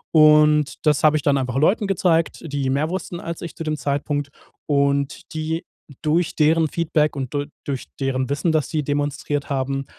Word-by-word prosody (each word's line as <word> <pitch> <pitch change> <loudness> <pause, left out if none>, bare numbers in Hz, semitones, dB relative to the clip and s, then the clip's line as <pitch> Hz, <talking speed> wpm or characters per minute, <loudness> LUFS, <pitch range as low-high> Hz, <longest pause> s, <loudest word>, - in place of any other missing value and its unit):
Und 150 -1 +5
das 150 -3 +3
habe 155 0 +5
ich 145 - -4
dann 140 -1 +3
einfach 130 -1 -3
Leuten 195 +8 +2
gezeigt, 170 -4 +1
die 140 -3 -2
mehr 145 +4 0
wussten 180 -2 -4
als 170 -1 -6
ich 170 - -7
zu - - -5
dem 155 -1 -2
Zeitpunkt 145 0 -2 0.4
und 140 0 0
die 160 +1 -3 0.4
durch 160 +2 +1
deren 160 +1 +3
Feedback 155 -3 0
und 135 -1 -4
du 145 0 -2 0.2
durch 135 -3 -3
deren 130 -1 -1
Wissen, 145 +4 0
das 155 -2 +1
sie 155 -2 -1
demonstriert 145 0 -2
haben, 135 0 -2
150 Hz, 180 wpm, -22 LUFS, 140-160 Hz, 0.4 s, Und